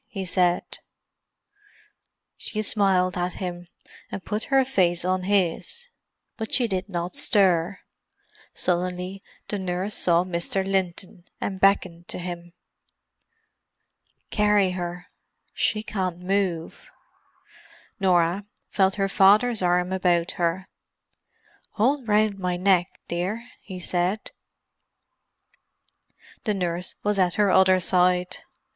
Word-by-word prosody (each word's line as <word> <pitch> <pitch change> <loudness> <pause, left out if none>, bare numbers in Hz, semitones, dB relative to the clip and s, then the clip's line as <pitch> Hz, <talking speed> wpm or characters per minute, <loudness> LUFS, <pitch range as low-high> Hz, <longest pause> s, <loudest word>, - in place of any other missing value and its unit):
he 195 -3 -5
said. 180 -1 0 1.6
She 215 0 -4
smiled 190 -3 +2
at 180 0 -1
him, 175 -2 -6 0.4
and 195 - -6
put 210 +2 -2
her 270 -1 +3
face 175 -8 +1
on 185 0 0
his, 205 - 0 0.5
but 220 -1 -5
she 245 -3 +3
did 190 -1 -3
not 175 -1 -3
stir. 185 -2 +2 0.7
Suddenly 180 +2 -2 0.3
the 205 - -3
nurse 185 +2 -3
saw 170 -2 +2
Mr. 180 +2 -1
Linton, 185 -2 -2
and 190 -1 -3
beckoned 185 -3 +2
to - - -3
him. 175 -1 -7 1.8
"Carry 210 -3 +3
her—she 180 +4 -4
can't 185 -5 -3
move." 180 -2 -2 1.1
Norah 185 +1 +2 0.2
felt 190 -1 +2
her 195 -1 0
father's 210 +4 +4
arm 180 +1 +1
about 175 -2 +1
her. 175 +2 -1 1.1
"Hold 255 +3 +1
round 210 -1 +2
my 180 -1 -1
neck, 185 -1 +3 0.2
dear," 195 +8 -3
he 185 -2 -8
said. 180 +4 -1 2.1
The 210 - +1
nurse 180 -1 -2
was 205 -1 +1
at 180 -2 +2
her 205 -2 +3
other 185 0 +5
side. 180 0 +2
185 Hz, 110 wpm, -25 LUFS, 175-200 Hz, 2.1 s, other